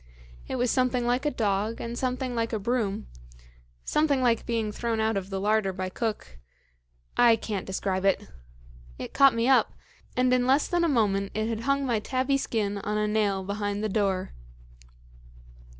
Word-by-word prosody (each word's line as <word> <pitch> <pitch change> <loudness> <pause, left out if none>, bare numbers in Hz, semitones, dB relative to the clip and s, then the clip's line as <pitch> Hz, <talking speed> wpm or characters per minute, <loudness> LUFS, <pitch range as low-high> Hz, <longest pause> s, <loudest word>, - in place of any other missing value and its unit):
It - - -3
was 245 -1 +1
something 255 -1 +1
like 250 +4 +1
a - - +4
dog 210 -2 -1
and 235 0 -5
something 255 0 -2
like 230 -1 -2
a - - +1
broom, 215 -1 -1 0.8
something 300 -3 +2
like 240 -3 +1
being 225 -3 -1
thrown 230 +1 -2
out 220 0 +1
of 195 -1 -3
the 195 -1 -3
larder 210 0 +1
by 185 0 -4
cook 210 - -4 0.8
I 235 -2 +6
can't 210 -3 -4
describe 190 0 -2
it. 195 -1 +1 0.7
It - - -7
caught 275 -4 +6
me 230 +1 +1
up, 265 -1 +4 0.4
and 250 0 +3
in 250 0 +2
less 275 +3 +3
than 350 -1 +1
a 335 - +2
moment 200 -6 +1
it 215 +1 0
had 225 -1 -2
hung 275 0 +2
my 235 -4 +1
tabby 260 +5 0
skin 205 -6 -1
on 210 +1 -2
a 210 0 +1
nail 205 -3 +1
behind 205 +1 -3
the 215 - 0
door. 195 -3 -1
225 Hz, 180 wpm, -27 LUFS, 200-250 Hz, 0.8 s, I